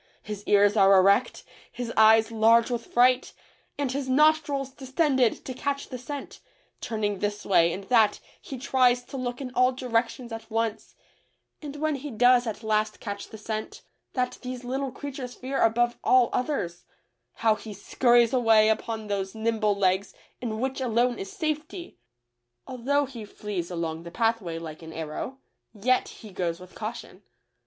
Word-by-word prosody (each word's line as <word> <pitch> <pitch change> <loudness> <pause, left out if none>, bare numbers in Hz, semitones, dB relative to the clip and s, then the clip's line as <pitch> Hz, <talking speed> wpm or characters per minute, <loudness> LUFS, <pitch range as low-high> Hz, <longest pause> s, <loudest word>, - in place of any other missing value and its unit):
His 210 -1 -6
ears 205 0 +4
are 195 -2 +6
erect, 200 +6 +3 0.3
his 245 -1 -5
eyes 220 +1 +6
large 230 +2 +4
with 235 -1 -3
fright, 250 +1 +3 0.4
and 280 -3 -1
his 270 0 -3
nostrils 285 -1 +2
distended 265 -2 0
to 260 - -4
catch 280 +2 -3
the 255 - -6
scent; 280 +2 -7 0.4
turning 205 -3 -2
this 205 +1 -3
way 170 -3 +4
and 195 +3 -5
that 220 -1 +3 0.2
he 270 - -7
tries 250 -1 +2
to 260 - -11
look 245 0 -4
in 255 -2 -5
all 255 +1 +4
directions 245 -1 -2
at 225 0 -7
once, 225 -1 -2 0.7
and 290 -2 -7
when 305 0 -1
he 290 +2 -7
does 245 +1 +4
at 220 +1 -5
last 215 0 0
catch 200 -2 -6
the 220 - -9
scent, 215 0 -5
— - - -52
that 250 -1 -1
these 255 0 -6
little 265 +2 -3
creatures 265 -2 -7
fear 265 +2 -3
above 240 +1 +2
all 255 -2 +4
others,— 245 - -2 0.5
how 225 -1 +2
he 215 +1 -9
scur 235 +5 +1
ries 235 0 +5
away 225 -3 +5
upon 220 0 -2
those 195 -1 -3
nimble 220 -2 +1
legs 190 0 0 0.3
in 220 -3 -3
which 265 +2 -2
alone 245 0 +1
is 390 0 -6
safety! 315 - -4 0.7
Although 280 +3 0
he 250 -5 -9
flees 205 -4 -5
along 165 -2 -3
the 170 - -9
pathway 225 -4 -1
like 160 -1 -8
an 160 0 -10
arrow, 160 - -5 0.4
yet 250 +5 +1
he 215 - -12
goes 170 -2 -2
with 180 0 -13
caution. 225 +2 -7
235 Hz, 165 wpm, -26 LUFS, 210-255 Hz, 0.7 s, are